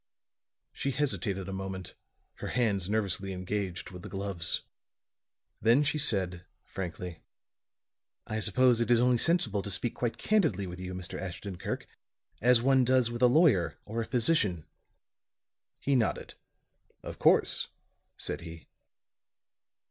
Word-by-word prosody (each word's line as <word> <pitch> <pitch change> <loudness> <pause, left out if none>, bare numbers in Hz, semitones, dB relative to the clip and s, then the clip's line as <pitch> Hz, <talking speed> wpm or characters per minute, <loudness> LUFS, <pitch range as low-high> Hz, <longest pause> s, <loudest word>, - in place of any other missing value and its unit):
She 140 - -2
hesitated 120 -9 -1
a 95 - -5
moment, 95 -1 -5 0.4
her - - -5
hands 100 -7 0
nervously 100 -2 -1
engaged 95 -1 -4
with 90 -1 -9
the 105 - -8
gloves. 95 -3 -2 1.0
Then 115 +7 +5
she 150 +1 0
said, 95 -9 +1 0.2
frankly. 90 -2 -6 1.0
"I 110 - -3
suppose 125 +2 +4
it 115 - 0
is 120 -1 +5
only 125 0 +3
sensible 135 - +2
to 100 - -6
speak 100 +5 -1
quite 120 -2 -2
candidly 160 - +1
with 90 0 -7
you, 90 0 -5
Mr. 90 -1 -5
Ashton 95 0 -6
Kirk, - - -4 0.6
as 120 0 +5
one 135 0 +4
does 125 -1 +3
with 120 +1 -5
a 125 - +7
lawyer 120 - +4
or 115 +2 -3
a - - -3
physician." 110 - +2 1.1
He 140 - +1
nodded. 115 -4 0 0.7
"Of - - -8
course," - - +4 0.5
said - - -4
he. 85 -1 -10
105 Hz, 135 wpm, -30 LUFS, 95-125 Hz, 1.1 s, a